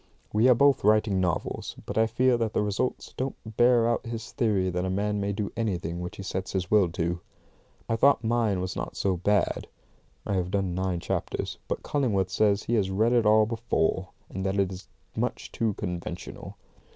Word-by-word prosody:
We 110 +5 +5
are 125 - +7
both 140 +2 +4
writing 105 -2 +3
novels, 90 -2 -2
but - - -5
I 110 0 +4
fear 125 +3 +3
that 115 -2 -1
the - - +1
results 105 +5 -2
don't 130 +1 -2
bear 120 +1 +4
out 120 - 0
his 115 0 -6
theory 100 -6 +1
that 90 +1 -1
a 95 - -1
man 105 +2 0
may 100 0 0
do 100 0 -3
anything 90 -7 -2
which 90 - -6
he 100 - -6
sets 95 -1 -4
his 90 -2 -2
will 105 -5 +5
to. 85 +1 -1 0.7
I 115 - 0
thought 135 -1 +4
mine 110 -4 +1
was 90 0 -3
not - - -5
so 95 -2 +1
bad 105 +4 +1 0.6
(I - - -1
have 90 -2 0
done 95 -2 0
nine 90 -1 -1
chapters), - - -3
but - - -3
Cullingworth 105 -10 0
says 105 0 +2
he 120 - -2
has 100 -5 +2
read 110 +5 +2
it 115 -3 +3
all 110 0 +6
before, 105 -5 -1 0.2
and 95 - -5
that 95 +1 0
it 95 -1 +1
is 95 0 -9 0.3
much - - -3
too 110 -3 -1
conventional. 90 0 -6
105 Hz, 200 wpm, -27 LUFS, 95-115 Hz, 0.7 s, are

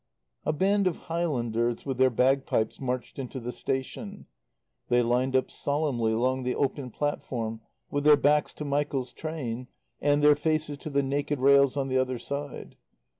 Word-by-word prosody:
A - - +4
band 195 +5 +2
of 180 - -1 0.2
Highlanders 120 -8 -1
with 135 -3 -3
their 130 0 +6
bagpipes 130 -2 +1
marched 125 0 -3
into 130 0 -5
the 120 0 -5
station. 165 - -4 0.6
They 120 0 +4
lined 125 +3 +1
up 130 - +1
solemnly 140 -6 0
along 130 +4 +1
the 125 0 -1
open 140 -1 -1
platform 115 -4 -3 0.3
with 145 0 -1
their 150 0 +7
backs 150 +1 +3
to 150 - -6
Michael's 140 -3 -1
train 130 -7 -5 0.3
and 145 0 +2
their 150 0 +7
faces 155 -1 -1
to 155 - -6
the 140 -1 +1
naked 145 +2 -1
rails 140 +1 +5
on 135 -1 0
the 130 0 +1
other 130 -1 0
side. 140 +3 -6
135 Hz, 165 wpm, -28 LUFS, 125-145 Hz, 0.6 s, their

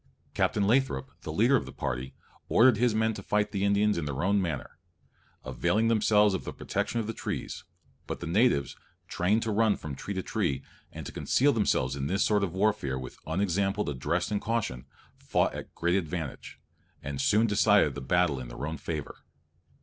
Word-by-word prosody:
Captain 105 - +1
Lathrop, 115 - +1
the 80 - -5
leader 115 - +4
of 125 - 0
the - - -7
party, 65 +2 -4 0.3
ordered 120 -1 +5
his 120 -1 +2
men 110 0 +2
to - - -7
fight 105 0 0
the 100 -2 -2
Indians 100 -1 +2
in 80 - -3
their 70 0 -3
own 100 +1 +3
manner, 80 -7 -4 0.7
availing 65 - +1
themselves 105 -2 +4
of 95 - -2
the - - -5
protection 120 - -2
of 110 - -2
the 115 - -3
trees; - - -5 0.4
but - - -4
the - - -6
natives, 90 - +2 0.3
trained 105 +6 +1
to 110 - -1
run 110 0 +3
from 75 - -6
tree 100 +9 -6
to 95 - -2
tree, 85 -12 -1 0.3
and - - -8
to - - -6
conceal 140 +2 +2
themselves 70 - +1
in 70 0 -3
this 95 +6 +1
sort 105 -1 +2
of 95 - -1
warfare 100 -9 +1
with 65 - -8
unexampled 95 +2 0
address 75 - -1
and 105 - 0
caution, 105 - -2 0.3
fought - - +1
at - - -8
great 85 +1 0
advantage, 80 -5 -4 0.4
and 70 -1 -3
soon 105 +9 +3
decided 105 -7 +4
the - - -6
battle 90 -1 +1
in 65 - -7
their - - -6
own 80 +1 -4
favour. 75 -4 -5
100 Hz, 190 wpm, -28 LUFS, 75-105 Hz, 0.7 s, ordered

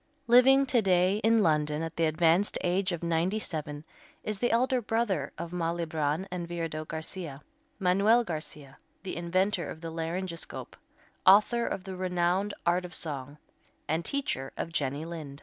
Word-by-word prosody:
Living 265 +3 +6
to 250 -3 +2
day 185 0 +3
in 225 0 +3
London 150 -1 +1
at 165 0 -5
the 165 - +2
advanced 165 +5 +2
age 185 +2 +1
of 175 -1 -4
ninety 170 +4 +1
seven 150 -7 -4 0.4
is 215 -2 -4
the 240 - +2
elder 250 +2 +2
brother 210 -10 -1
of 170 0 -5
Malibran 165 -1 -1
and 175 -1 -4
Viardot 165 -2 -4
Garcia, 160 -3 -5 0.3
Manuel 200 +6 +4
Garcia, 155 -6 -7 0.2
the 190 - -4
inventor 175 0 0
of 160 - -7
the 165 0 -6
laryngoscope, 170 +1 -5 0.5
author 215 +5 +5
of 185 - -3
the 190 -1 -6
renowned 185 +2 0
"Art 175 +1 +2
of 180 0 -5
Song," 145 -2 -4 0.5
and 160 +2 0
teacher 165 - -2
of 165 - -4
Jenny 145 0 -1
Lind. 155 -4 -7
175 Hz, 155 wpm, -29 LUFS, 160-195 Hz, 0.5 s, Living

